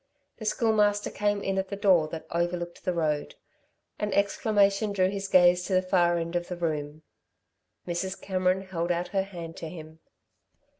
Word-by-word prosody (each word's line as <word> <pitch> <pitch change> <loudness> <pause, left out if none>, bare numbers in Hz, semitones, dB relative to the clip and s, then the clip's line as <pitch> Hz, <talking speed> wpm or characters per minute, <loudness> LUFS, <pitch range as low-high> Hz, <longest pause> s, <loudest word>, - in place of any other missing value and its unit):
The 220 - -8
Schoolmaster 210 -2 +2
came 205 -1 0
in 195 0 0
at 190 - -2
the 200 - -3
door 190 -6 +4
that 160 +1 -7
overlooked 175 0 -2
the 185 - +2
road. 155 -3 -1 0.6
An 210 -1 -1
exclamation 200 0 +2
drew 185 -1 +2
his 200 0 -4
gaze 180 -1 +5
to 190 - 0
the 185 - +3
far 175 -2 +2
end 170 +1 -3
of 175 0 -1
the 180 - -5
room. 155 -2 -3 0.8
Mrs. 185 +2 -3
Cameron 185 0 0
held 175 -2 -2
out 175 +1 -1
her 195 -2 +1
hand 175 -4 -8
to 160 - -6
him. 160 -1 -11
185 Hz, 170 wpm, -27 LUFS, 170-200 Hz, 0.8 s, gaze